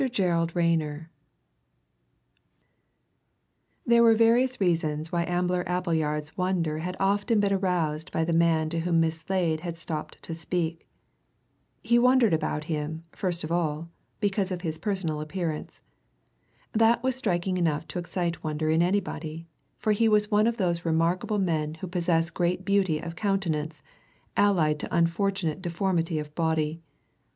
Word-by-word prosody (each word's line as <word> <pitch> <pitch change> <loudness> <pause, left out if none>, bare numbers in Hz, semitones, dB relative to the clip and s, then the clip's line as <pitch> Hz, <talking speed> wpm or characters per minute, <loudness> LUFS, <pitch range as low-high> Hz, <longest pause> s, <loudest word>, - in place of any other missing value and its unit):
GERALD 170 -6 0
RAYNER 160 -2 0 2.7
There 235 0 +5
were 230 -1 +6
various 240 +3 +3
reasons 160 -4 0
why 170 -1 0
Ambler 180 0 0
Appleyard's 160 -4 -1
wonder 175 -4 0
had 180 +3 -4
often 205 +3 +2
been 200 -1 +2
aroused 175 -4 -1
by 160 - 0
the 170 - 0
man 165 -1 +3
to 165 +1 -2
whom 170 0 +1
Miss 165 0 +1
Slade 165 -2 0
had 170 0 -5
stopped 155 -2 -5
to 165 - -5
speak. 165 0 -3 1.0
He 235 +1 +4
wondered 250 -4 +4
about 155 -1 -1
him, 155 +1 -4
first 180 -3 -2
of 155 - -5
all, 165 -1 -1 0.3
because 200 -2 0
of 180 -2 -4
his 160 -3 -3
personal 175 -6 -2
appearance. 160 0 -4 0.9
That 225 +2 +3
was 260 -1 +1
striking 185 -6 -1
enough 160 -3 0
to - - -3
excite 175 -1 -3
wonder 155 0 -1
in 160 +1 +3
anybody, 165 -3 -2 0.3
for 215 - 0
he 225 +2 +3
was 210 0 +2
one 210 +1 +4
of 235 0 0
those 175 -4 0
remarkable 170 +5 +1
men 160 -5 0
who 160 - -7
possess 170 -2 0
great 180 +1 -1
beauty 195 -5 +2
of 165 +1 -6
countenance 165 -7 -1 0.5
allied 165 -7 +3
to - - -4
unfortunate 170 +1 0
deformity 170 -2 -1
of 150 -1 -5
body. 160 -1 0
170 Hz, 145 wpm, -27 LUFS, 160-195 Hz, 2.7 s, were